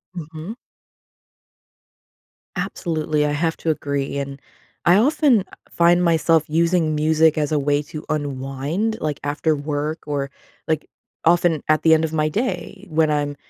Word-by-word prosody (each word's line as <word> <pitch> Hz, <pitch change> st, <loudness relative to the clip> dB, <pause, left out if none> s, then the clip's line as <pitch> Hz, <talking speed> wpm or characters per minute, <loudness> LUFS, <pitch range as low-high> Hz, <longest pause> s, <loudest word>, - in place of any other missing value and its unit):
Mhm. 165 Hz, +4 st, -7 dB, 2.0 s
Absolutely, 155 Hz, -3 st, -1 dB
I 150 Hz, -, 0 dB
have 160 Hz, +2 st, 0 dB
to 165 Hz, -, -3 dB
agree, 140 Hz, -2 st, -2 dB
and 140 Hz, 0 st, -5 dB, 0.5 s
I 175 Hz, -, +6 dB
often 255 Hz, -, +3 dB, 0.2 s
find 175 Hz, +1 st, +3 dB
myself 165 Hz, -1 st, +3 dB
using 165 Hz, 0 st, +2 dB
music 155 Hz, +1 st, +3 dB
as 150 Hz, -1 st, 0 dB
a 150 Hz, -, +2 dB
way 145 Hz, +1 st, +1 dB
to 150 Hz, +1 st, -8 dB
unwind, 145 Hz, +8 st, -2 dB
like, 150 Hz, -2 st, -2 dB
after 150 Hz, +2 st, 0 dB
work 150 Hz, +2 st, -3 dB
or, 140 Hz, -2 st, -2 dB, 0.4 s
like, 155 Hz, -1 st, -1 dB, 0.4 s
often 170 Hz, -2 st, +3 dB
at 155 Hz, 0 st, +4 dB
the 160 Hz, -, +6 dB
end 160 Hz, 0 st, +3 dB
of 160 Hz, -, -1 dB
my 155 Hz, -1 st, +1 dB
day 205 Hz, 0 st, -3 dB
when 155 Hz, -1 st, +2 dB
I'm 145 Hz, -1 st, -1 dB
155 Hz, 140 wpm, -21 LUFS, 145-170 Hz, 2.0 s, I